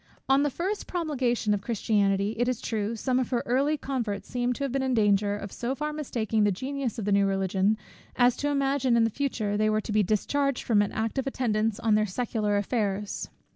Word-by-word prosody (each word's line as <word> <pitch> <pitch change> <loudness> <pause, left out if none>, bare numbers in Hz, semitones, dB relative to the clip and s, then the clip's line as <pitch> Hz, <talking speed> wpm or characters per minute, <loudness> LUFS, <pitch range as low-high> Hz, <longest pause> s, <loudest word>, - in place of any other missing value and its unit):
On 270 +1 +4
the 290 - +2
first 380 +9 -3
promulgation 260 -11 0
of 205 - -1
Christianity, 205 -2 +1
it 245 - +2
is 250 -2 0
true, 220 0 -2
some 255 +3 0
of 255 - -1
her 245 -2 0
early 275 +5 +2
converts 235 -8 -3
seem 245 0 -1
to 280 - -5
have 275 - -1
been 270 +1 0
in 260 -1 0
danger 205 -1 +2
of 200 -1 -7
so 250 +2 -3
far 300 +1 -3
mistaking 230 -7 -1
the 205 - +3
genius 260 +4 -3
of 220 - -3
the 205 - 0
new 200 0 +4
Religion, 195 +2 +1 0.4
as 245 -1 +4
to 290 - -1
imagine 275 -3 +1
that 230 - +4
in 225 - +3
future 220 -5 -2
they 215 0 +2
were 215 0 +2
to 215 - -6
be 210 0 +3
discharged 260 +7 0
from 215 -3 +3
an 205 - -1
active 225 +5 -2
attendance 225 -4 0
on 225 -2 +2
their 215 0 +3
secular 210 0 -1
affairs. 205 -1 -2
230 Hz, 215 wpm, -27 LUFS, 205-265 Hz, 0.4 s, On